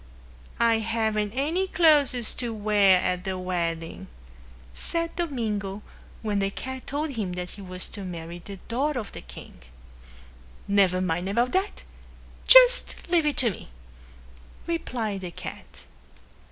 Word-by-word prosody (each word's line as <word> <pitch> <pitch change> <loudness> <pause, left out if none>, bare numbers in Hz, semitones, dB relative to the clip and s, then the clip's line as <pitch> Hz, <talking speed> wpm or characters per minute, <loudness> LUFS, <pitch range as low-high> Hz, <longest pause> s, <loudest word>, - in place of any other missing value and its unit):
"I 230 -1 +4
haven't 220 -2 -1
any 325 +8 0
clothes 290 -10 +3
to 240 -2 -3
wear 205 -3 +4
at 180 0 -1
the 190 -1 -3
wedding," 170 -3 -3 0.7
said 335 - -4
Domingo 215 - -3 0.4
when 210 -2 0
the 195 0 +1
cat 260 +5 -7
told 295 +2 -2
him 210 -8 -3
that 180 0 -5
he 205 - -10
was 185 -1 -4
to 205 - -7
marry 170 -1 -7
the 200 - -8
daughter 270 +3 0
of 210 - -7
the - - -9
king. 65 -1 -12 1.1
"Never 195 -2 +3
mind 180 +1 -1
about 240 +5 +1
that. 380 +2 -1 0.6
Just - - +8
leave 335 -3 +3
it 295 - 0
to 235 -4 +3
me," - - -10 1.0
replied 230 - -3
the 180 - -5
cat. 170 - -8
215 Hz, 140 wpm, -26 LUFS, 185-275 Hz, 1.1 s, Just